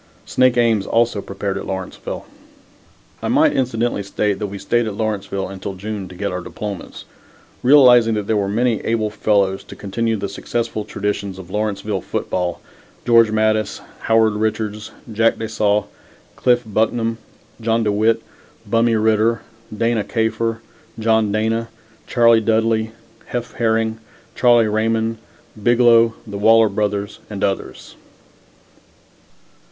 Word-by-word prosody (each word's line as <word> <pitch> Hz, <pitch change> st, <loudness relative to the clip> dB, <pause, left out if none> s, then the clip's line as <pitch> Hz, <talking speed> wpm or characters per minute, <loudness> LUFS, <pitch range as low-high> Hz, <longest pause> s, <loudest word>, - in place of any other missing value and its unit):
Snake 130 Hz, -1 st, +2 dB
Ames 115 Hz, -4 st, +2 dB
also 115 Hz, -3 st, +1 dB
prepared 100 Hz, 0 st, -4 dB
at -, -, -7 dB
Lawrenceville. 95 Hz, -1 st, -5 dB, 1.0 s
I -, -, -3 dB
might -, -, +4 dB
incidentally 120 Hz, -4 st, 0 dB
state 100 Hz, 0 st, -1 dB
that 105 Hz, -, -2 dB
we 100 Hz, 0 st, -7 dB
stayed 120 Hz, +4 st, 0 dB
at 105 Hz, -, -4 dB
Lawrenceville 100 Hz, -3 st, -2 dB
until 95 Hz, 0 st, -6 dB
June 100 Hz, 0 st, -5 dB
to 90 Hz, -, -12 dB
get 100 Hz, +2 st, -3 dB
our 90 Hz, 0 st, -3 dB
diplomas, 100 Hz, 0 st, -7 dB, 0.6 s
realizing 125 Hz, -4 st, +6 dB
that 105 Hz, -1 st, -2 dB
there 110 Hz, -, 0 dB
were 100 Hz, -1 st, 0 dB
many 115 Hz, +1 st, +1 dB
able 110 Hz, -2 st, 0 dB
fellows 100 Hz, -3 st, +1 dB
to -, -, -11 dB
continue 110 Hz, +3 st, -2 dB
the 100 Hz, 0 st, -3 dB
successful 110 Hz, +2 st, -3 dB
traditions 100 Hz, -1 st, -3 dB
of 95 Hz, -1 st, -11 dB
Lawrenceville 105 Hz, -1 st, -2 dB
football, 90 Hz, -2 st, -3 dB, 0.4 s
George 115 Hz, -2 st, +5 dB
Mattis, 110 Hz, 0 st, 0 dB, 0.2 s
Howard 110 Hz, -1 st, +3 dB
Richards, 105 Hz, 0 st, -2 dB, 0.2 s
Jack 115 Hz, +2 st, +2 dB
de 110 Hz, -, -4 dB
Saulles, 105 Hz, -1 st, +1 dB, 0.5 s
Cliff 125 Hz, -1 st, +2 dB
Bucknam, 115 Hz, +2 st, 0 dB, 0.4 s
John 115 Hz, 0 st, +1 dB
De 105 Hz, -, +1 dB
Witt, 110 Hz, +2 st, +2 dB, 0.4 s
Bummie 115 Hz, 0 st, +2 dB
Ritter, 110 Hz, +1 st, +2 dB, 0.3 s
Dana 115 Hz, 0 st, 0 dB
Kafer, 115 Hz, 0 st, -1 dB, 0.4 s
John 110 Hz, -1 st, +2 dB
Dana, 110 Hz, +2 st, 0 dB, 0.4 s
Charlie 115 Hz, -2 st, +4 dB
Dudley, 110 Hz, 0 st, +1 dB, 0.4 s
Heff 120 Hz, -1 st, -4 dB
Herring, 110 Hz, -1 st, 0 dB, 0.3 s
Charlie 120 Hz, -2 st, +4 dB
Raymond, 110 Hz, +1 st, 0 dB, 0.4 s
Biglow, 115 Hz, 0 st, +4 dB
the 100 Hz, -2 st, -6 dB
Waller 110 Hz, +1 st, +5 dB
brothers 105 Hz, 0 st, -2 dB
and 105 Hz, -2 st, -5 dB
others. 95 Hz, -1 st, -3 dB
110 Hz, 135 wpm, -19 LUFS, 100-115 Hz, 1.0 s, realizing